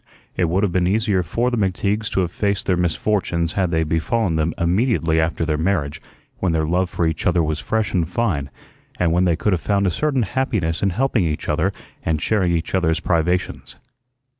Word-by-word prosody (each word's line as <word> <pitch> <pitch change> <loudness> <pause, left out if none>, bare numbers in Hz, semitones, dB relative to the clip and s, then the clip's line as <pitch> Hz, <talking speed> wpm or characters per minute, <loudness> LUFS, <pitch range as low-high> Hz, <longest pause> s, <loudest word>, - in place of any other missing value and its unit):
It 90 - +1
would 90 +5 +1
have 100 - +1
been 90 0 +1
easier 105 -1 +1
for 115 +9 -1
the 120 - -1
McTeagues 100 +2 0
to 95 - +2
have 85 -2 -1
faced 100 0 -1
their 90 - +2
misfortunes 85 -1 0
had 95 -3 +1
they 80 -1 +1
befallen 80 +4 0
them 80 +1 0
immediately 85 -2 +1
after 80 +1 0
their 75 -1 -1
marriage, 80 -5 -1 0.4
when 90 -3 0
their 80 -1 +1
love 90 +3 +1
for 85 - -1
each 80 +2 -1
other 85 -1 +3
was 75 0 -1
fresh 110 -2 -1
and 85 -3 +1
fine, 90 -10 -1 0.5
and 90 -2 +2
when 90 +2 +3
they 85 -2 +3
could 100 +4 0
have 85 - -1
found 100 -1 +1
a 90 - +2
certain 140 - 0
happiness 105 -7 -1
in 100 - +2
helping 115 0 +1
each 75 -1 -3
other - - +1 0.3
and 80 -1 0
sharing 95 0 +1
each 85 -1 -2
other's 85 -3 +2
privations. 90 +1 -1
90 Hz, 205 wpm, -21 LUFS, 80-100 Hz, 0.5 s, other